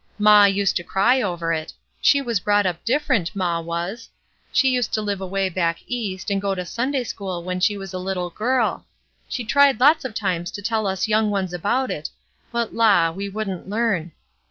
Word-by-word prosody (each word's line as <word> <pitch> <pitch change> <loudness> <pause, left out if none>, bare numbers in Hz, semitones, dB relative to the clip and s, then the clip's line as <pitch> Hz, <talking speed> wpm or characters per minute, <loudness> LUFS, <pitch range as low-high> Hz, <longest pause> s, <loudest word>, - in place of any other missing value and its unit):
Maw 210 -1 +7
used 200 0 +2
to 175 - -4
cry 235 +9 +2
over 175 -5 -1
it; 155 -1 -4 0.3
she 280 -1 +4
was 235 -6 0
brought 205 +1 +2
up 175 -2 -2
different, 230 - 0
maw 175 -3 0
was. 170 +7 -5 0.4
She 265 - +3
used 250 -3 +1
to 215 - -1
live 200 -2 -2
away 195 +1 -1
back 170 -2 0
East, 205 -5 -4
and 195 -1 0
go 195 -1 -1
to 180 -1 -4
Sunday 255 +7 -1
school 190 -6 -5
when 180 +1 -3
she 205 +2 +2
was 195 -1 -8
a - - -3
Uttle 180 -1 -3
girl; 245 +1 +1
and - - -26 0.5
she 245 - -2
tried 275 +2 +4
lots 300 +5 +5
of 250 -5 -6
times 175 -5 -1
to 205 - -6
tell 220 -1 0
us 190 +2 -1
young 215 0 +2
ones 190 -3 -2
about 240 +9 0
it, - - -4 0.4
but 235 -2 -2
la! 200 -8 +4
we 200 +4 -5
wouldn't 195 -3 -5
learn. 200 -6 0
200 Hz, 205 wpm, -22 LUFS, 185-230 Hz, 0.5 s, Maw